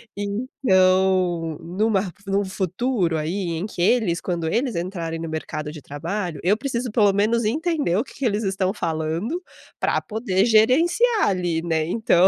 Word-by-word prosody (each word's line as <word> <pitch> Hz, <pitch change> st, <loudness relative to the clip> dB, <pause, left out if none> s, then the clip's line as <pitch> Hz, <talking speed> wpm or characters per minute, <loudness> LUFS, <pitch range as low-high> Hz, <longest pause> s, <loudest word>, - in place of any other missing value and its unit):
Então, 185 Hz, -, +1 dB
numa 195 Hz, +3 st, +1 dB
r 190 Hz, -, -5 dB, 0.2 s
num 195 Hz, +1 st, +1 dB
futuro, 190 Hz, -1 st, -1 dB
aí, 170 Hz, +3 st, -2 dB
em 180 Hz, -, -3 dB
que 180 Hz, -, -5 dB
eles 185 Hz, -4 st, +2 dB
quando 170 Hz, -3 st, -2 dB
eles 240 Hz, -, 0 dB
entrarem 170 Hz, -2 st, -3 dB
no 165 Hz, -1 st, -5 dB
mercado 155 Hz, -1 st, -4 dB
de 150 Hz, -2 st, -10 dB
trabalho, 170 Hz, +4 st, -4 dB
eu 190 Hz, +4 st, +4 dB
preciso 245 Hz, -2 st, -3 dB
pelo 210 Hz, -3 st, +4 dB
menos 220 Hz, +4 st, +2 dB
entender 300 Hz, -, 0 dB
o 220 Hz, -, +1 dB
que -, -, -15 dB
que 275 Hz, -, -4 dB
eles 215 Hz, -1 st, +1 dB
estão 190 Hz, 0 st, 0 dB
falando, 165 Hz, -, -2 dB, 0.4 s
pra -, -, +1 dB
poder 210 Hz, -3 st, 0 dB
gerenciar 330 Hz, -, +4 dB
ali, 175 Hz, -3 st, 0 dB
né. 160 Hz, -2 st, 0 dB
Então, 185 Hz, -3 st, +4 dB
190 Hz, 160 wpm, -23 LUFS, 170-225 Hz, 0.4 s, eu